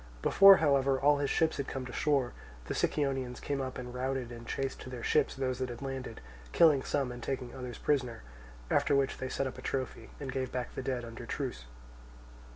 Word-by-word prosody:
Before 195 0 +9
however 140 -3 +3
all 145 +1 +4
his 140 -1 -1
ships 160 0 +2
had 140 - -3
come 130 -1 -4
to 125 - -8
shore, 140 -4 +1 0.3
the - - -3
Sicyonians 135 -4 -1
came 140 -1 -2
up 130 -1 -4
and 125 -1 -6
routed 130 -1 -2
and 120 -1 -9
chased 135 -1 -3
to - - -8
their 125 -2 -7
ships 150 -2 +2
those 130 -1 -2
that 130 -1 -2
had 120 +2 -7
landed, 135 -1 -5 0.3
killing 155 -5 +6
some 135 -2 -1
and 120 0 -8
taking 125 -1 -4
others 125 -2 -6
prisoners; 125 - -1 0.5
after 140 - +3
which 140 -1 +1
they 130 - -3
set 135 - -1
up 130 -1 -5
a - - -8
trophy, 130 0 -3
and 135 -3 -4
gave 130 -1 -2
back 125 -1 -4
the - - -4
dead 130 -2 -2
under 120 +1 -9
truce. 125 - -4
130 Hz, 210 wpm, -31 LUFS, 125-140 Hz, 0.5 s, Before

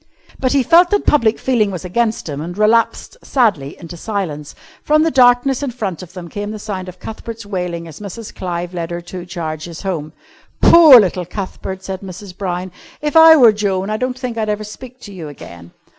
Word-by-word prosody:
But 255 0 0
he 275 -2 +3
felt 345 +7 +5
that 410 -1 0
public 230 -7 +3
feeling 235 -6 +1
was 185 -1 -6
against 220 +3 -1
him, 145 -1 -5
and 175 +4 -7
relapsed 225 - +1
sadly 195 - 0
into 170 0 -10
silence. 165 -7 -5 0.3
From 305 +1 +3
the 325 - +1
darkness 250 0 +4
in 285 - -2
front 210 -9 -4
of 180 - -12
them 180 -2 -8
came 205 +4 -5
the 215 - -5
sound 190 -3 -6
of 180 - -12
Cuthbert's 225 +3 -8
wailing 180 -4 -4
as 160 -2 -11
Mrs. 210 +2 -8
Clive 175 -1 -5
led 170 -2 -4
her 170 0 -4
two 175 +1 -9
charges 165 -1 -6
home. 160 -6 -3 0.5
"Poor 315 -7 +9
little 185 -3 0
Cuthbert!" 190 -1 -6
said 190 -1 -6
Mrs. 190 0 -10
Brown. 185 -1 -4 0.3
"If 300 0 -3
I 320 0 +9
were 245 -7 +7
Joan, 200 -1 -2
I 215 - -1
don't 255 +2 -3
think 250 -3 -4
I'd 215 -1 -1
ever 210 0 -2
speak 250 +4 -11
to 205 - -10
you 170 -5 -8
again." 85 -11 -12
200 Hz, 205 wpm, -17 LUFS, 175-235 Hz, 0.5 s, Poor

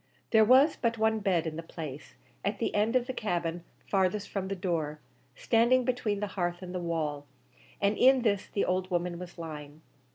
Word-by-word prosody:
There 220 -1 +6
was 260 +7 +5
but 230 -1 0
one 220 0 +2
bed 185 -6 +1
in 160 -1 -4
the - - -3
place, 150 - -8 0.3
at - - -1
the - - -2
end 215 +4 +1
of 250 -1 +3
the 260 - -4
cabin 175 -6 -2 0.2
farthest 195 +1 0
from 195 -2 -3
the 195 - -3
door, 165 -5 -2 0.4
standing 240 +2 +3
between 225 -5 -1
the - - +1
hearth 175 -1 -2
and 180 0 -7
the 180 - -2
wall, 155 -4 -3 0.5
and 200 +1 +2
in 260 -1 +6
this 200 -4 +1
the 200 - -1
old 185 0 -1
woman 175 -1 -1
was 180 -1 -9
lying. 155 -2 -8
185 Hz, 195 wpm, -29 LUFS, 170-220 Hz, 0.5 s, There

